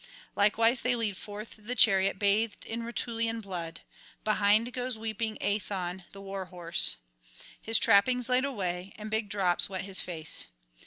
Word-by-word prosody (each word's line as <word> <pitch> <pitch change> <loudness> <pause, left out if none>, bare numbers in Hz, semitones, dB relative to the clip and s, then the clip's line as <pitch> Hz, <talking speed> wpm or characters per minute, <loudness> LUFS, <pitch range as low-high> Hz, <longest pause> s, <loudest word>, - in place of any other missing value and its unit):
Likewise 225 +4 +4
they 250 0 +2
lead 220 -4 -1
forth 210 +3 -8
the 225 +4 -4
chariot 195 -4 +4
bathed 205 +1 +1
in 230 +1 -4
Rutulian 230 -1 -2
blood; 175 -5 -6 0.4
behind 215 +3 +2
goes 250 -2 -2
weeping 220 0 -3
Aethon 190 -3 -2
the 195 - -11
war 195 -1 -5
horse, 175 -2 0 0.6
his 225 0 +3
trappings 235 +3 +4
laid 255 0 +2
away, 190 -8 -3
and 215 0 -7
big 220 -1 -1
drops 190 -3 +2
wet 190 -1 -3
his 195 -1 +2
face. 160 -3 -2
210 Hz, 150 wpm, -29 LUFS, 190-230 Hz, 0.6 s, Likewise